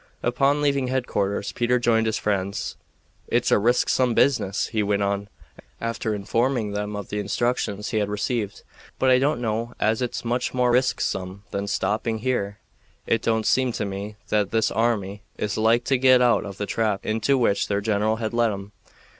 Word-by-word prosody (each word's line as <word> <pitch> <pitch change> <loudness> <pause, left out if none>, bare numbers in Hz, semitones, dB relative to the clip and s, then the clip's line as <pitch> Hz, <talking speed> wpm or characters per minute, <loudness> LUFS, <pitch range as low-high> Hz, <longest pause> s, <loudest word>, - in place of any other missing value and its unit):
Upon 140 +4 +2
leaving 140 -2 +1
headquarters 100 -6 -1
Peter 125 +1 +1
joined 115 -2 +2
his 110 - 0
friends. 100 -1 -2 0.5
"It's - - +1
a - - +5
risksome 120 +2 +2
business," 115 -8 +2
he 110 -1 -1
went 100 0 +1
on, 100 0 -1 0.5
after 115 -1 -2
informing 115 +2 0
them 105 0 -3
of 100 -2 -6
the 105 - -2
instructions 105 -1 -1
he 110 - +1
had 105 -1 -1
received, 105 0 -2 0.3
"but 130 - +3
I 125 - +6
don't 145 +1 +1
know 115 +1 -2
as 110 +3 +1
it's 125 -1 -3
much 125 +2 -1
more 125 -1 +3
risksome 100 -6 0
than 100 0 -3
stopping 105 +3 -1
here. 105 -4 -2 0.5
It 115 - +1
don't 110 -1 0
seem 130 -2 +2
to 105 - -2
me 100 +2 -5
that 105 -2 +1
this 110 -1 +1
army 105 -4 0 0.2
is 105 - -2
like 115 +2 +3
to 135 +1 +1
get 130 -1 +6
out 120 -3 +3
of 100 -1 -8
the 105 - -2
trap 105 -2 -1
into 110 +5 +1
which 110 -5 +1
their 100 -1 0
general 105 +1 +1
has 110 0 -3
led 115 -1 +2
'em. 100 0 -7
110 Hz, 180 wpm, -24 LUFS, 100-120 Hz, 0.5 s, I